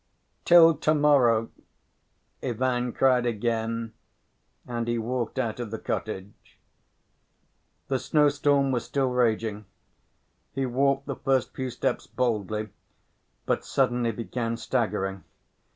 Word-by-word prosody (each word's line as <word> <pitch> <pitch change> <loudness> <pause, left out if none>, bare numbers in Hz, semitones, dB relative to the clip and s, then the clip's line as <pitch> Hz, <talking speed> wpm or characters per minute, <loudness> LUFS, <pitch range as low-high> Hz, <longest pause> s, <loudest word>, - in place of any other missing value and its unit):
"Till 165 -2 +7
to‐morrow!" 140 -7 +3 0.9
Ivan 125 0 -1
cried 125 -1 +3
again, 115 0 -2 0.7
and 120 -1 -3
he 120 0 0
walked 120 +2 -3
out 120 -3 -2
of 120 -3 -4
the 110 - -4
cottage. 105 -2 -6 1.3
The 135 -1 0
snowstorm 145 -2 +2
was 125 -3 -1
still 135 -2 -1
raging. 110 -3 0 0.9
He 135 +1 -1
walked 135 +2 +1
the 140 - -4
first 130 -2 0
few 130 -1 -3
steps - - -2
boldly, 110 -3 -2 0.8
but - - 0
suddenly 125 -3 +1
began 115 +1 -3
staggering. 105 -5 -2
120 Hz, 105 wpm, -26 LUFS, 115-135 Hz, 1.3 s, Till